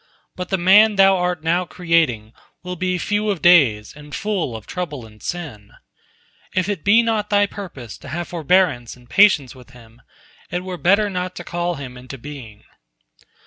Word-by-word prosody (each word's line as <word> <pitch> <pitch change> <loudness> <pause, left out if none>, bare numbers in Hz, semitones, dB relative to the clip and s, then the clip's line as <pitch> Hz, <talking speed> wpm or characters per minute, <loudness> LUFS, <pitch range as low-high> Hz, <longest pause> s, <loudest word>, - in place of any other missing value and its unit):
But 180 0 -6
the 190 - +1
man 205 +4 +5
Thou 195 0 +5
art 180 -3 -2
now 170 +2 +1
creating 160 -11 0 0.3
will 180 0 -5
be 185 +1 -1
few 210 +4 -1
of 195 -4 -1
days 135 -12 +4
and 150 -2 -10
full 195 - -2
of 110 -2 -9
trouble 150 -9 -5
and 105 -1 -17
sin. 135 -13 -7 0.8
If 185 0 +1
it 205 -6 -3
be 220 +4 +5
not 220 -2 -1
Thy 205 -1 +3
purpose 170 - -9
to - - -12
have 175 +1 -4
forbearance 160 -7 +1
and 125 -1 -20
patience 155 - +4
with 125 -1 -16
him, 115 -1 -17 0.5
it 180 +1 -3
were 185 -1 -6
better 200 +5 +3
not 185 -2 -4
to 175 - -7
call 175 0 -3
him 125 -4 -8
into 130 +2 -10
being." 125 -6 -11
175 Hz, 180 wpm, -20 LUFS, 125-190 Hz, 0.8 s, man